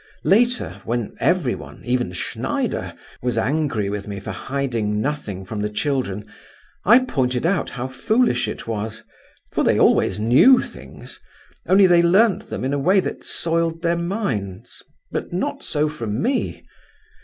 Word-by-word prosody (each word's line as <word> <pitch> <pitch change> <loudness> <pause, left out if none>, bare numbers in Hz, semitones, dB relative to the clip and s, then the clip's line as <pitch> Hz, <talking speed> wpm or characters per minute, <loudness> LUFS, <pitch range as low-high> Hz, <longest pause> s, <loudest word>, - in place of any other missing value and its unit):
Later, 240 +9 +2
when 120 -2 -3
everyone—even 125 - -1
Schneider—was 120 +6 -3
angry 135 -4 0
with 100 0 -4
me 100 -1 -5
for 95 - -6
hiding 120 -6 -2
nothing 110 -8 -3
from 105 +3 -5
the 105 0 -1
children, 105 -4 -2 0.6
I 240 +5 +6
pointed 125 - 0
out 180 +1 +1
how 125 0 -4
foolish 130 - +1
it 105 - -6
was, 110 0 -4 0.5
for - - +1
they - - +3
always - - +3
knew 130 - +6
things, - - -9 0.5
only 195 +1 +6
they 175 -2 +6
learnt 195 +5 +3
them - - -4
in 135 - -1
a 145 - 0
way 185 +8 +4
that - - -4
soiled 165 0 -1
their 170 0 +2
minds 170 - -3 0.3
but - - -4
not - - -2
so 150 +1 0
from 115 -7 -4
me. 255 - -1
135 Hz, 145 wpm, -22 LUFS, 110-170 Hz, 0.6 s, I